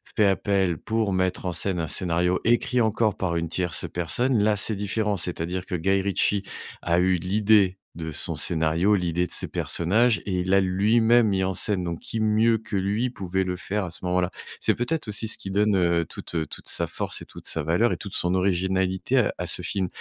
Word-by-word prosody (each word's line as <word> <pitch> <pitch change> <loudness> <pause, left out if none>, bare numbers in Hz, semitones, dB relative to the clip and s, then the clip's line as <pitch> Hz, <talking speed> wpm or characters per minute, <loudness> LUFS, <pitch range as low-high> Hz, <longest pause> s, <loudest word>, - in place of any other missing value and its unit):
fait 105 - +4
appel 95 -4 +1
pour 110 -3 -1
mettre 95 0 -1
en 90 - -2
scène 95 -1 -1
un 80 - -2
scénario, 90 +2 0
écrit 120 +1 +2
encore 110 -1 +1
par 85 -3 -1
une 85 0 -2
tierce 90 0 -2
personne. 120 +9 0
Là 105 0 +3
c'est 105 +2 -1
différent, 105 +1 -1
c'est-à-dire 90 +1 -3
que - - -8
Guy 95 +3 +1
Ritchie 100 +1 0 0.4
a 85 0 +2
eu 90 0 +3
l'idée 100 +1 +2 0.2
de 80 -1 -5
son 75 - -1
scénario, 80 +4 +1
l'idée 90 -2 0
de - - -9
ses - - -1
personnages 110 +7 +2
et 90 -3 -1
il 90 - -4
l'a 95 - +5
lui-même 110 +5 +3
mis 95 -1 +1
en 95 - -1
scène 90 0 -1
donc 85 -1 -4
qui 115 - -4
mieux 110 +1 +3
que 110 -1 -7
lui 100 +6 0
pouvait 95 -4 -2
le 90 0 -2
faire 100 +2 -3
à - - -6
ce 85 - -5
moment-là? 90 0 0 0.3
C'est - - +1
peut-être 125 +4 -2
aussi 105 +1 -2
ce - - -1
qui 95 - -7
donne, 105 +1 +2
heu, 85 -2 +2
toute, 85 - -5
heu, 80 -1 0
toute - - -9
sa - - 0
force - - -3
et - - -8
toute - - -10
sa - - -1
valeur 85 +10 +2
et - - -3
toute 100 - -7
son 90 +1 +1
originalité 95 +3 0
à 110 - +1
à 90 - -3
ce 85 - +2
film. 95 +2 -1
95 Hz, 220 wpm, -25 LUFS, 90-105 Hz, 0.4 s, l'a